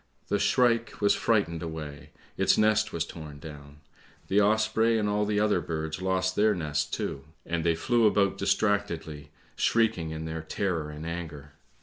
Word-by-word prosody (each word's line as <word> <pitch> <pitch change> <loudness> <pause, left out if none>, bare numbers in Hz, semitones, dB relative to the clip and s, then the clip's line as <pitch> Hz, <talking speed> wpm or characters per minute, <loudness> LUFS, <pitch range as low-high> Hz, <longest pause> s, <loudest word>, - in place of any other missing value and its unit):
The 100 - +1
shrike 120 -1 +2
was 100 - +4
frightened 100 -8 +1
away; 80 -3 -7 0.3
its - - +3
nest 110 0 +3
was 80 -1 -2
torn 75 -4 -9
down; 75 -1 -11 0.5
the 100 +2 +4
osprey 110 +2 +2
and 105 -1 0
all 105 0 0
the 105 -1 +1
other 105 -4 +2
birds 80 +1 -4
lost 95 0 0
their 105 0 +3
nests 75 -3 -2
too, 70 - -4 0.2
and 85 -1 -2
they 85 0 +2
flew 115 +6 +3
about 100 -1 +2
distractedly, 95 -8 -1 0.3
shrieking 110 -8 +1
in 80 0 -5
their 80 0 -4
terror 80 -1 -2
and 75 +1 -8
anger. 80 -4 -6
90 Hz, 160 wpm, -28 LUFS, 80-105 Hz, 0.5 s, was